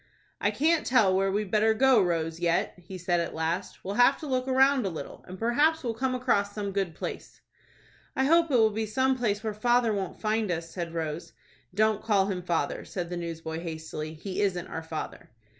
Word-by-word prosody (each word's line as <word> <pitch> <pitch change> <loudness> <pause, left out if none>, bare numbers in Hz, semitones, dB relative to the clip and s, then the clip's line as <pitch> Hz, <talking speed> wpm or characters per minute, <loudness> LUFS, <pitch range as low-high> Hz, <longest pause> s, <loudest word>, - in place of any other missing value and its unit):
"I - - +2
can't 320 +2 +2
tell 215 -7 +4
where 195 0 +2
we'd 205 -1 -2
better 220 +1 +3
go, 260 -2 +5
Rose, 165 -2 -1
yet," 170 -1 +1
he 185 +2 -9
said 175 0 0
at 170 - -3
last. 165 +4 -3
"We'll 195 - -3
have 275 +3 +6
to - - -5
look 255 -2 -1
round 265 0 +4
a 195 - -1
little, 165 - -8
and 185 - -8
perhaps 290 - +2
we'll 235 -2 -1
come 255 +3 -1
across 205 -5 +1
some 205 -2 -3
good 190 -4 -2
place." - - -7 0.8
"I 265 - +2
hope 330 +3 +4
it'll 225 -5 +4
be 220 +1 -2
some 260 +5 +2
place 215 -4 -1
where 220 -1 -2
father 240 +1 +2
won't 195 -2 -4
find 215 -1 0
us," 165 -1 -3
said 170 -2 -5
Rose. 160 0 -4 0.4
"Don't 215 0 +2
call 205 -4 +2
him 180 -2 -3
father," 170 -5 -1
said 175 -2 -5
the 175 - -3
newsboy, 165 -1 -5
hastily. 160 -2 -6
"He 185 +5 -4
isn't 180 -4 0
our 160 - -4
father." 160 -1 -6
200 Hz, 205 wpm, -28 LUFS, 170-240 Hz, 0.8 s, have